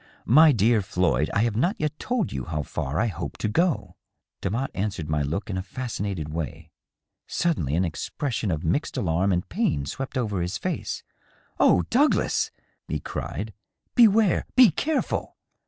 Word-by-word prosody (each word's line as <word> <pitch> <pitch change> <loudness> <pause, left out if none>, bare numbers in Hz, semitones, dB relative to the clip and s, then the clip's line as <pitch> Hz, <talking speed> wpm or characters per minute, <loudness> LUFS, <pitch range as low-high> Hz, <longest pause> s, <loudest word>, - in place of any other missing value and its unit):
"My 155 +6 +7
dear 115 -2 +3
Floyd, 85 -7 +1
I 105 - +2
have 115 -3 0
not 175 - +2
yet 150 0 -2
told 245 -5 -1
you 65 - -3
how 75 -3 -2
far 70 +2 -3
I 115 - +3
hope 90 -6 -4
to - - -1
go." 105 - 0 0.4
Demotte 115 +8 -1
answered 95 -6 -3
my 75 -1 +1
look 80 +9 -2
in 95 -3 -2
a - - -1
fascinated 100 - -4
way. 80 0 -5 0.6
Suddenly 80 - 0
an 90 +3 +2
ex 80 - -4
Eression 115 -8 -1
of 80 0 -2
mixed 90 - -1
alarm 90 +2 +1
and 90 -1 0
pain 70 -1 0
swept 130 - -5
over 105 -7 -1
his 90 +1 -2
face. - - -3 0.3
" - - -35
Oh, 90 - +5
Douglas 285 +6 +3 0.4
I" - - -3
e - - 0
cried; - - -5 0.2
" - - -51
beware! 220 -5 +5
be 250 -4 +8
careful 315 0 -1
100 Hz, 175 wpm, -25 LUFS, 85-140 Hz, 0.6 s, be